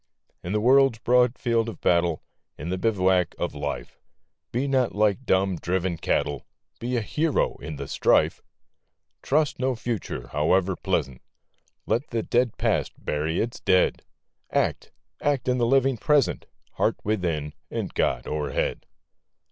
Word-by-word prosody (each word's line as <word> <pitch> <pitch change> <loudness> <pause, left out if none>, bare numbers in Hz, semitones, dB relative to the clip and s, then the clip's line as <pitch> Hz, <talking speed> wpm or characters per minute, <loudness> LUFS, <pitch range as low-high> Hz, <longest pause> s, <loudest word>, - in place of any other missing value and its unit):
In 90 - -5
the 105 - +1
world's 130 +1 +5
broad 125 +1 +3
field 115 -2 +1
of 105 - -9
battle, 85 -2 +2 0.3
In 75 +5 -6
the 95 +1 -2
bivouac 95 -4 +2
of - - -2
Life, - - -5 0.5
Be 130 +4 -1
not 130 -5 +1
like 105 +4 +1
dumb, 95 -1 +2
driven 90 +1 -1
cattle! 75 -2 -1 0.3
Be 125 +1 -1
a - - +1
hero 155 +8 0
in 80 - -7
the 70 -1 -6
strife! - - +2 0.8
Trust 150 0 +1
no 130 0 +1
Future, 110 - -4
howe'er 90 +6 +2
pleasant! 65 -5 -2 0.6
Let 120 +6 0
the 115 -2 -2
dead 120 -1 +1
Past - - 0
bury 75 +2 -2
its 115 +1 -2
dead! 90 0 +2 0.5
Act, - - -1 0.2
— - - -36
act 145 -3 0
in 125 0 +2
the 120 - +2
living 135 0 +3
Present! 145 +1 +2 0.2
Heart - - +1
within, 85 -8 -1 0.2
and - - -4
God - - 0
o'erhead 75 -1 -2
105 Hz, 150 wpm, -25 LUFS, 85-125 Hz, 0.8 s, world's